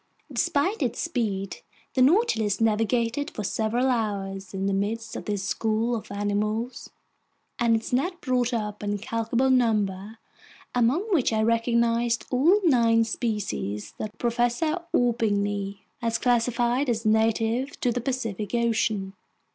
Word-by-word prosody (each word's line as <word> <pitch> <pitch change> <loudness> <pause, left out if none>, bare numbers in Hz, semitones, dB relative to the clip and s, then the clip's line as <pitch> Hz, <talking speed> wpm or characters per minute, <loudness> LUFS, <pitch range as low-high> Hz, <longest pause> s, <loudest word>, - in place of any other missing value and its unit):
Despite 345 +4 +1
its 245 -4 -1
speed, 210 - -2 0.4
the 260 - +1
Nautilus 255 - +3
navigated 230 +5 +1
for 210 - -6
several 225 +5 0
hours 200 -5 -2
in 195 0 -3
the 195 - +1
midst 220 +3 -2
of - - -6
this 205 -2 -2
school 225 +4 0
of 220 - -7
animals, 210 +4 -2 0.7
and 235 -1 +3
its 225 +2 -3
nets 345 +9 +1
brought 250 -2 0
up 210 -3 -3
an 205 0 -1
incalculable 230 +5 0
number, 215 -4 +1 0.6
among 245 - +2
which 285 -10 +3
I 220 -1 +1
recognized 230 +1 +1
all 325 +11 +4
nine 230 -5 +4
species 210 - -3
that 215 0 -5
Professor 245 +8 0
Orbigny 205 -4 0 0.2
has 230 -1 0
classified 245 +2 +1
as 225 -1 -1
native 225 +4 +1
to 245 - +2
the 245 +1 -2
Pacific 230 -5 -3
Ocean. 220 -4 0
230 Hz, 130 wpm, -26 LUFS, 210-245 Hz, 0.7 s, all